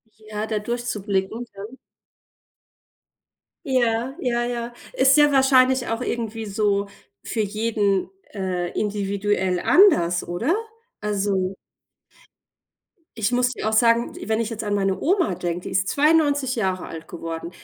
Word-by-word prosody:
Ja, 215 Hz, 0 st, -6 dB
da 215 Hz, -2 st, -1 dB
durchzublicken, 220 Hz, -1 st, -2 dB
dann. 205 Hz, +6 st, -9 dB, 1.9 s
Ja, 245 Hz, -1 st, +1 dB
ja, 240 Hz, -4 st, 0 dB
ja. 240 Hz, 0 st, -4 dB, 0.2 s
Ist 265 Hz, +2 st, +5 dB
ja 295 Hz, -1 st, +6 dB
wahrscheinlich 260 Hz, -1 st, +4 dB
auch 225 Hz, +2 st, -2 dB
irgendwie 225 Hz, -2 st, -3 dB
so 200 Hz, -1 st, 0 dB, 0.4 s
für 225 Hz, -, -2 dB
jeden, 210 Hz, -2 st, 0 dB, 0.2 s
äh, 180 Hz, -3 st, -2 dB
individuell 200 Hz, -2 st, 0 dB
anders, 175 Hz, -, +4 dB
oder? 235 Hz, -, 0 dB, 0.5 s
Also 195 Hz, -2 st, -1 dB, 1.6 s
Ich 215 Hz, +3 st, +1 dB
muss 250 Hz, 0 st, +2 dB
dir 230 Hz, -, -4 dB
auch 220 Hz, -, 0 dB
sagen, 230 Hz, +1 st, +3 dB
w -, -, -8 dB
wenn 220 Hz, 0 st, +1 dB
ich 230 Hz, 0 st, -2 dB
jetzt 225 Hz, 0 st, -4 dB
an 205 Hz, -1 st, -1 dB
meine 195 Hz, -1 st, 0 dB
Oma 355 Hz, -, +2 dB
denke, 175 Hz, 0 st, -3 dB
die -, -, -7 dB
ist 190 Hz, 0 st, +1 dB
92 290 Hz, -3 st, +2 dB
Jahre 190 Hz, -4 st, -1 dB
alt 165 Hz, 0 st, -9 dB
geworden. 165 Hz, 0 st, -6 dB
215 Hz, 135 wpm, -23 LUFS, 195-245 Hz, 1.9 s, ja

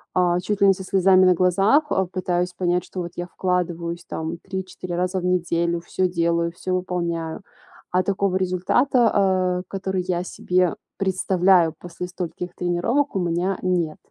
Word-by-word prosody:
а, 180 Hz, -1 st, +3 dB
чуть 205 Hz, +2 st, -2 dB
ли 200 Hz, -, +7 dB
не 195 Hz, -, +6 dB
со 190 Hz, 0 st, -8 dB
слезами 190 Hz, 0 st, +4 dB
на 180 Hz, -1 st, +5 dB
глазах, 195 Hz, -, +3 dB
э, 190 Hz, -1 st, +1 dB
пытаюсь 180 Hz, -1 st, -1 dB
понять, 180 Hz, 0 st, 0 dB
что 185 Hz, -, -6 dB
вот 170 Hz, 0 st, -5 dB
я 175 Hz, 0 st, -4 dB
вкладываюсь 175 Hz, -2 st, -2 dB
там 160 Hz, +1 st, -4 dB
3-4 185 Hz, -2 st, -6 dB
раза 180 Hz, +1 st, 0 dB
в 180 Hz, -, -5 dB
неделю, 170 Hz, -1 st, +1 dB
всё 185 Hz, +2 st, -1 dB
делаю, 170 Hz, -1 st, 0 dB
всё 185 Hz, +2 st, -4 dB
выполняю, 170 Hz, -3 st, -2 dB, 0.5 s
а 185 Hz, +1 st, +2 dB
такого 195 Hz, -1 st, 0 dB
результата, 190 Hz, -1 st, +2 dB
э, -, -, -12 dB
который 190 Hz, -1 st, -2 dB
я 175 Hz, -1 st, 0 dB
себе 180 Hz, -1 st, 0 dB, 0.2 s
представляю 185 Hz, -3 st, +3 dB
после 175 Hz, 0 st, -7 dB
стольких 180 Hz, 0 st, -6 dB
тренировок, 200 Hz, +12 st, 0 dB
у -, -, +1 dB
меня 175 Hz, +2 st, 0 dB
нет. 175 Hz, -4 st, 0 dB
180 Hz, 160 wpm, -23 LUFS, 175-190 Hz, 0.5 s, ли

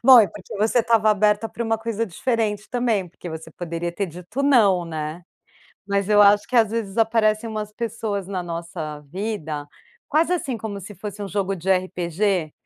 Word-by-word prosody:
Bom, 260 Hz, 0 st, +10 dB
é 210 Hz, -, +4 dB
porque 205 Hz, 0 st, -9 dB
você 220 Hz, +4 st, +2 dB
estava 220 Hz, -2 st, +3 dB
aberta 210 Hz, +1 st, +2 dB
para 235 Hz, -, -5 dB
uma 225 Hz, -1 st, 0 dB
coisa 230 Hz, 0 st, -2 dB
diferente 215 Hz, +1 st, -1 dB
também, 235 Hz, -7 st, 0 dB
porque 175 Hz, +1 st, -10 dB
você 160 Hz, 0 st, -7 dB
poderia 170 Hz, 0 st, -4 dB
ter 200 Hz, +2 st, -2 dB
dito 180 Hz, -, -5 dB
não, 205 Hz, -11 st, +4 dB
né? 155 Hz, +1 st, -5 dB, 0.6 s
Mas 200 Hz, -1 st, 0 dB
eu 210 Hz, -1 st, +5 dB
acho 205 Hz, 0 st, +6 dB
que, 250 Hz, -, 0 dB
às 220 Hz, -2 st, +5 dB
vezes, 225 Hz, -3 st, -3 dB
aparecem 225 Hz, 0 st, +2 dB
umas 215 Hz, -1 st, -4 dB
pessoas 215 Hz, -3 st, -3 dB
na 185 Hz, -2 st, -3 dB
nossa 165 Hz, -3 st, -5 dB
vida, 160 Hz, -7 st, -4 dB, 0.4 s
quase, 325 Hz, +4 st, +3 dB
assim, 275 Hz, -9 st, -1 dB
como 205 Hz, -2 st, -5 dB
se 205 Hz, +3 st, -9 dB
fosse 205 Hz, +2 st, -7 dB
um 200 Hz, -, -4 dB
jogo 195 Hz, 0 st, -1 dB
de 190 Hz, +1 st, -3 dB
RPG? 180 Hz, -2 st, 0 dB
205 Hz, 185 wpm, -23 LUFS, 180-225 Hz, 0.6 s, Bom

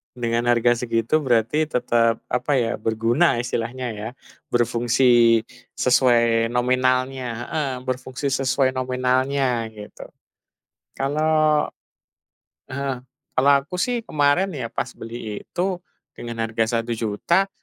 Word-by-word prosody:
dengan 115 Hz, -1 st, -1 dB
harga 120 Hz, 0 st, +4 dB
segitu, 115 Hz, +4 st, 0 dB
berarti 125 Hz, +5 st, +1 dB
tetap, 115 Hz, -2 st, +2 dB
apa 125 Hz, +3 st, -1 dB
ya, 115 Hz, -1 st, 0 dB
berguna 115 Hz, +9 st, +2 dB
istilahnya, 120 Hz, +1 st, -3 dB
ya. 105 Hz, +1 st, -5 dB, 0.4 s
Berfungsi 120 Hz, 0 st, +4 dB, 0.4 s
sesuai 115 Hz, -2 st, +3 dB
nominalnya. 130 Hz, +1 st, +1 dB, 0.2 s
Heeh. 150 Hz, -3 st, -1 dB, 0.2 s
Berfungsi 130 Hz, +2 st, -3 dB
sesuai 130 Hz, 0 st, +1 dB
nominalnya, 130 Hz, -1 st, 0 dB
gitu. 105 Hz, -1 st, -11 dB, 0.9 s
Kalau 155 Hz, +2 st, +2 dB, 1.0 s
heeh. 135 Hz, -1 st, -3 dB, 0.4 s
Kalau 140 Hz, +2 st, +5 dB
aku 180 Hz, +5 st, -6 dB
sih, 245 Hz, +1 st, 0 dB
kemarin 145 Hz, +5 st, +2 dB
ya, 130 Hz, -6 st, -4 dB
pas -, -, -3 dB
beli 115 Hz, -2 st, -7 dB
itu, 185 Hz, +1 st, -2 dB, 0.4 s
dengan 115 Hz, -1 st, -6 dB
harga 115 Hz, +1 st, 0 dB
Rp1.000.000, 115 Hz, -, 0 dB
125 Hz, 105 wpm, -22 LUFS, 115-135 Hz, 1.0 s, Kalau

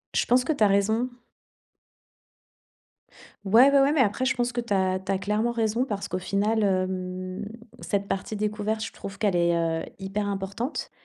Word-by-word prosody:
Je -, -, +2 dB
pense 250 Hz, +1 st, +3 dB
que 315 Hz, -, 0 dB
tu 245 Hz, -, +1 dB
as -, -, +7 dB
raison. 220 Hz, +5 st, +2 dB, 2.4 s
Ouais, 235 Hz, +8 st, +7 dB
ouais, 280 Hz, 0 st, +5 dB
ouais, 275 Hz, +2 st, +4 dB
mais 305 Hz, -, +1 dB
après, 220 Hz, +1 st, +2 dB
je 260 Hz, +1 st, +1 dB
pense 245 Hz, 0 st, -1 dB
que 240 Hz, -, -1 dB
tu 235 Hz, -3 st, -3 dB
as 185 Hz, -1 st, +1 dB
tu 190 Hz, +1 st, -3 dB
as 195 Hz, -, +1 dB
clairement 210 Hz, +4 st, 0 dB
raison 230 Hz, +1 st, 0 dB
parce 205 Hz, -6 st, -4 dB
qu'au 180 Hz, -, -3 dB
final, 205 Hz, +4 st, 0 dB
hem, 185 Hz, 0 st, -2 dB, 0.4 s
cette 200 Hz, -1 st, -2 dB
partie 195 Hz, +3 st, -3 dB
découverte, 215 Hz, +1 st, -2 dB
je -, -, -8 dB
trouve 195 Hz, 0 st, -8 dB
qu'elle 205 Hz, -4 st, +1 dB
est, 170 Hz, 0 st, +3 dB
heu, 165 Hz, -1 st, 0 dB, 0.2 s
hyper 200 Hz, +2 st, -3 dB
importante. 200 Hz, +7 st, -4 dB
205 Hz, 185 wpm, -26 LUFS, 190-230 Hz, 2.4 s, as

